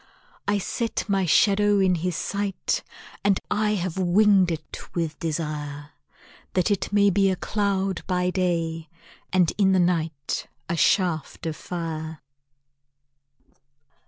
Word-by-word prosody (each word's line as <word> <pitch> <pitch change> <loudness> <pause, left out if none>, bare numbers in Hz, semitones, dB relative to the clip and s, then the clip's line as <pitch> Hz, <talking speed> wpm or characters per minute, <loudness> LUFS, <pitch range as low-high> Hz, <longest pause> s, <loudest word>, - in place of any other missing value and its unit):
I 205 0 +2
set 230 +4 -2
my 195 -3 +1
shadow 205 +4 +4
in 190 -1 +4
his 175 0 -1
sight 200 +2 -2 0.4
And 200 -1 +3
I 210 0 +2
have 185 -1 -3
winged 190 +1 +4
it 155 -1 -6 0.2
with 165 -3 -2
desire, 150 -2 -4 0.6
That 185 +3 +2
it 200 - -1
may 205 -1 +4
be 195 +1 +3
a 190 - +1
cloud 195 -1 -1
by 180 -1 +1
day, 165 -3 -1 0.4
And 180 -3 +3
in 190 -1 +4
the 185 - +4
night 160 -5 -1 0.2
a 170 - -1
shaft 170 -2 +1
of 160 -1 -2
fire. 160 -4 -5
180 Hz, 130 wpm, -25 LUFS, 165-195 Hz, 0.6 s, shadow